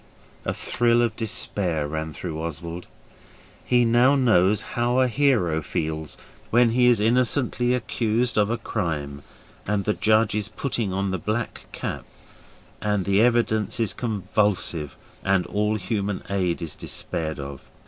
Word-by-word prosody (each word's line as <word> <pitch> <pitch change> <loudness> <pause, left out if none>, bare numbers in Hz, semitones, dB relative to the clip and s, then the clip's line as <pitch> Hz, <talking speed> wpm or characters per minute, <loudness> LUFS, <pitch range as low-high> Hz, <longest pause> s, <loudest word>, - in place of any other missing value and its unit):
A - - 0
thrill 120 0 +2
of 115 -2 0
despair 90 -8 -1
ran 80 +1 -4
through 80 +2 -5
Oswald. 85 +2 -5 0.8
He 125 -1 +3
knows 120 +4 +4 0.5
now - - -12
how 120 +1 +1
a 130 - +4
hero 115 - +2
feels 80 0 -3 0.3
when 120 0 +4
he 125 +1 +4
is 120 -3 +5
innocently 125 +2 +2
accused 120 0 0
of 105 -1 +3
a 115 - 0
crime 75 -9 -3 0.5
and 105 -1 0
the 105 - +1
judge 110 0 +3
is 105 0 -2
putting 115 -3 -2
on 95 +1 -1
the 95 - -2
black 110 +5 -3
cap, - - -4 0.8
and 105 -3 0
the 100 +1 +3
evidence 115 -3 +2
is 115 -3 +1
convulsive 100 - -1 0.3
and 95 -2 +2
all 105 +1 0
human 100 0 -2
aid 90 -3 0
is 80 - -3
despaired 80 -1 -3
of. 70 -1 -7
105 Hz, 145 wpm, -24 LUFS, 85-120 Hz, 0.8 s, is